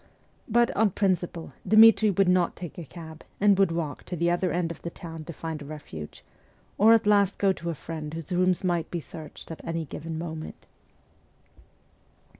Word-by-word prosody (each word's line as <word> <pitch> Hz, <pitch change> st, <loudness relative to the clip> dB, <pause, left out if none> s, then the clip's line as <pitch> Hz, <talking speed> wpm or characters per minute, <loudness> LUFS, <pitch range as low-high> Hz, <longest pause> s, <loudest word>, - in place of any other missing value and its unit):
But, 240 Hz, +1 st, +3 dB
on 220 Hz, 0 st, +4 dB
principle, 180 Hz, -4 st, -1 dB
Dmitri 220 Hz, 0 st, +7 dB
would 195 Hz, 0 st, +2 dB
not 180 Hz, -1 st, +2 dB
take 175 Hz, -1 st, -8 dB
a -, -, -5 dB
cab, 160 Hz, +1 st, -11 dB, 0.2 s
and 200 Hz, -1 st, +4 dB
would 195 Hz, -4 st, +4 dB
walk 165 Hz, -3 st, -3 dB
to 180 Hz, -, -5 dB
the 170 Hz, +1 st, +1 dB
other 175 Hz, +1 st, 0 dB
end 170 Hz, -1 st, -1 dB
of 170 Hz, -, -9 dB
the 170 Hz, -, -4 dB
town 165 Hz, -2 st, -9 dB
to 170 Hz, -, -6 dB
find 160 Hz, -1 st, -6 dB
a -, -, -8 dB
refuge, 140 Hz, -, -9 dB, 0.5 s
or 215 Hz, +3 st, +7 dB
at 230 Hz, -1 st, +5 dB
last 200 Hz, -2 st, +3 dB
go 195 Hz, -1 st, +3 dB
to 170 Hz, -2 st, -6 dB
a 165 Hz, -, -2 dB
friend 155 Hz, 0 st, -6 dB
whose 165 Hz, 0 st, -7 dB
rooms 180 Hz, 0 st, +2 dB
might 175 Hz, -3 st, 0 dB
be 175 Hz, -, -3 dB
searched 155 Hz, +1 st, -10 dB
at 160 Hz, -, -8 dB
any 165 Hz, -1 st, -3 dB
given 160 Hz, +3 st, -6 dB
moment. 160 Hz, -1 st, -7 dB
170 Hz, 190 wpm, -27 LUFS, 160-195 Hz, 0.5 s, Dmitri